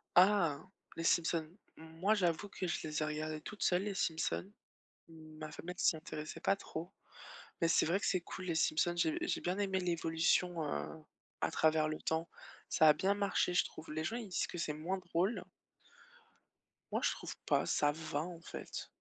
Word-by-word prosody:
Ah 175 -6 +5 0.3
les 165 - -3
Simpsons, 165 -2 +2 0.3
moi 165 +6 0
j'avoue 185 0 +1
que 185 -1 -4
je 170 - -2
les 155 0 -1
ai - - +2
regardé 155 0 -3
toute 210 +6 -8
seule 180 +2 +3
les 205 -2 -2
Simpsons, 165 +3 -1 0.6
ma 155 -1 -9
famille 175 +3 -6
elle - - -29
s'y 160 - +4
intéressait 155 -1 -6
pas 195 - +3
trop 170 -2 -6 0.7
mais 165 - +3
c'est - - +5
vrai 180 +5 +2
que - - -1
c'est 185 -2 +2
cool 185 +2 -7
les 170 - 0
Simpsons, 165 +2 +2
j'ai 315 - +2
j'ai 350 - 0
bien 180 +3 -1
aimé 195 -2 +1
l'évolution, 170 0 +1
heu, 155 +2 -4 0.4
à - - +2
travers 155 -1 +3
le 155 - -3
temps, 160 +1 -1 0.4
ça 160 - +6
a 150 - +10
bien 195 +1 +2
marché 200 -3 +1
je - - +5
trouve 155 -1 -8
les 155 0 -2
gens, 225 +8 -1
ils 230 -4 -5
disent 180 - 0
que 175 - -7
c'est 155 -2 -1
moins 170 +6 -2
drôle 180 +4 0 1.5
moi, - - +1
je - - +4
trouve - - -6
pas, - - +3
ça 145 0 +3
va, 155 -1 -3
en 175 -1 -7
fait. - - -6
165 Hz, 195 wpm, -35 LUFS, 155-185 Hz, 1.5 s, a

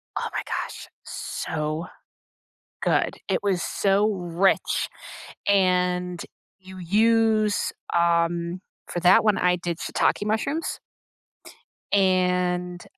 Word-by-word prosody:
Oh - - -2
my - - -1
gosh, - - -5 0.2
so 155 +2 -4 0.9
good. - - +1
It - - +2
was 190 -3 +1
so 200 +4 +2
rich, 180 +1 +1 0.6
and 180 -2 +2 0.4
you 190 0 -12
use 215 +2 +2 0.2
um, 170 +1 +1 0.3
for 175 - -3
that 180 +2 +6
one 210 -3 +3
I 180 0 +3
did 170 -1 -4
shiitake 205 - 0
mushrooms 225 +10 -2 1.1
and 180 -2 +1
180 Hz, 95 wpm, -24 LUFS, 175-200 Hz, 1.1 s, that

